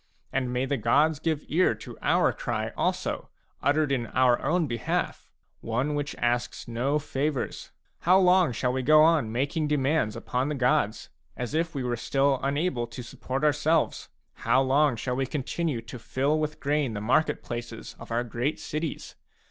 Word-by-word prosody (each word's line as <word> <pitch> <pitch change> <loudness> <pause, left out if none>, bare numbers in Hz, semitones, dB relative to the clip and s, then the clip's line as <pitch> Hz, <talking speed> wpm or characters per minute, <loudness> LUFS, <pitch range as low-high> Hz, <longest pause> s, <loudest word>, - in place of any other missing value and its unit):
And 130 -2 0
may 125 +1 0
the 140 +1 -1
gods 145 +7 +3
give 160 -2 -1
ear 175 +5 +3
to - - -10
our - - +3
cry - - -3
also, - - -2 0.3
uttered 145 0 +2
in 120 -4 0
our 125 -1 +3
own 170 +1 +1
behalf, 120 -5 -2 0.2
— - - -47
one 125 +6 -1
which 145 0 -3
asks 120 0 -1
no 125 +5 0
favours! 145 -1 -3 0.3
How 180 +2 +5
long 180 -4 +5
shall 125 +2 -1
we 130 - -1
go 155 +4 +6
on 155 -9 +3
making 145 +6 -1
demands 145 -5 +1
upon 130 +3 -2
the 150 - -2
gods, 130 -4 +1 0.3
as 125 +2 -4
if 160 0 -1
we 135 - -2
were 120 -1 -1
still 135 +3 +1
unable 140 -3 -1
to 120 +2 -8
support 130 +3 -5
ourselves? 155 +2 +1 0.2
How - - +2
long 135 0 +3
shall 120 +3 -3
we 135 0 -1
continue 150 -1 -2
to 120 +2 -9
fill 140 +6 0
with 155 0 -3
grain 140 -3 0
the - - -2
market 130 +8 +1
places 120 -1 -6
of 115 - -10
our 115 +1 0
great 120 +5 -2
cities 155 +1 -4
135 Hz, 175 wpm, -27 LUFS, 125-150 Hz, 0.3 s, go